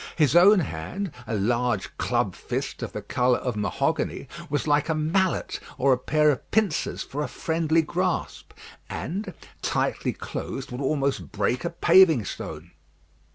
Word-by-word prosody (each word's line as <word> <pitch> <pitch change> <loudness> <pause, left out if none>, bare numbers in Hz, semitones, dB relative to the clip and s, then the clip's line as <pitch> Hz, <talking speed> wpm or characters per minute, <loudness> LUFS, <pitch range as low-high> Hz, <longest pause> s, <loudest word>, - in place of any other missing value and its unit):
His 150 -2 +3
own 190 +3 +7
hand, 150 - -4 0.2
a 110 - -1
large 120 0 0
club - - 0
fist - - -4
of - - -4
the - - -6
colour 125 0 +2
of 125 -3 -3
mahogany, 105 -1 -1 0.2
was 145 - -1
like 145 +1 +2
a 160 - +2
mallet 170 +5 0 0.2
or 135 0 +4
a - - +1
pair 150 +3 +3
of 135 - -5
pincers 215 -7 0
for 145 +2 -5
a 150 - -1
friendly 160 0 +1
grasp, 180 +2 -2 0.4
and, 195 +3 -4 0.3
tightly - - 0
closed, 135 0 -6
would 125 +2 -5
almost 140 0 -1
break 120 +1 0
a - - -1
paving 170 - +5
stone. 80 0 -7
150 Hz, 155 wpm, -25 LUFS, 125-170 Hz, 0.4 s, own